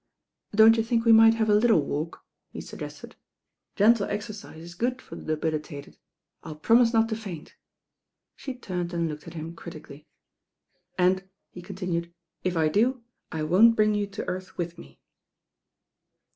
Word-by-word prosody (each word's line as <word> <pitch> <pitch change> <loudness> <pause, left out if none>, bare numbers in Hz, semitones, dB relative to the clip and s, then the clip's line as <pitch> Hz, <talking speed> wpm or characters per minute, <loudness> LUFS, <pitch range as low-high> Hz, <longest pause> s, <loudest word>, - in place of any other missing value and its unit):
"Don't 220 +1 +7
you 225 - +2
think 230 0 0
we 230 - +6
might 225 0 +7
have 220 -1 0
a 210 - +4
little 220 -2 +4
walk," 155 +4 -5 0.2
he - - -9
suggested. - - -9 0.6
"Gentle 215 0 +4
exercise 205 -6 -7
is 170 0 -10
good 245 +7 -2
for - - -11
the 155 0 -3
debili 155 0 -1
tated. 145 -2 -11 0.4
I'll 155 -2 -8
promise 230 +9 +4
not 225 -1 +3
to 220 - -1
faint." 195 -8 -8 0.8
She 265 -2 -7
turned 180 -7 -5
and 170 -1 0
looked 150 0 -7
at 170 - -10
him 165 +1 -7
critically. 155 -2 -11 0.9
"And," 190 +1 +1 0.2
he 180 - -10
continued, 175 -2 -4 0.3
"if 185 -2 -1
I 160 -1 +3
do, 235 +9 +1 0.3
I 160 -2 -3
won't 205 +9 +5
bring 215 -1 +3
you 205 -1 -1
to 200 +1 -7
earth 185 +1 -6
with 170 -1 -4
me." 70 0 -15
185 Hz, 165 wpm, -26 LUFS, 165-225 Hz, 0.9 s, Don't